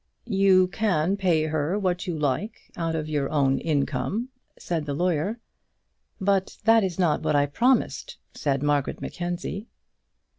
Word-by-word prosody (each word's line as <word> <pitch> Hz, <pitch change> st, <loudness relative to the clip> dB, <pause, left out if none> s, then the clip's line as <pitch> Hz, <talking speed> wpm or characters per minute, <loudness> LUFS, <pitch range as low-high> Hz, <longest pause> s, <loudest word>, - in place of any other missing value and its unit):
"You 195 Hz, -3 st, +4 dB
can 185 Hz, -3 st, +1 dB
pay 180 Hz, -6 st, +2 dB
her 155 Hz, +4 st, -1 dB
what 185 Hz, -3 st, -1 dB
you 170 Hz, -3 st, -2 dB
like 155 Hz, -, -2 dB
out 165 Hz, -1 st, -2 dB
of 155 Hz, -1 st, -3 dB
your 145 Hz, -3 st, -1 dB
own 135 Hz, -3 st, +2 dB
income," 150 Hz, -, -1 dB, 0.3 s
said 160 Hz, -4 st, -3 dB
the 140 Hz, -, -2 dB
lawyer. 180 Hz, +6 st, 0 dB, 0.8 s
"But 195 Hz, -1 st, 0 dB
that 225 Hz, 0 st, +5 dB
is 185 Hz, -3 st, -2 dB
not 175 Hz, -5 st, +2 dB
what -, -, 0 dB
I 145 Hz, 0 st, +4 dB
promised," 250 Hz, -, 0 dB, 0.2 s
said 140 Hz, -1 st, -1 dB
Margaret 145 Hz, -2 st, 0 dB
Mackenzie. 175 Hz, +4 st, -4 dB
175 Hz, 145 wpm, -25 LUFS, 150-195 Hz, 0.8 s, that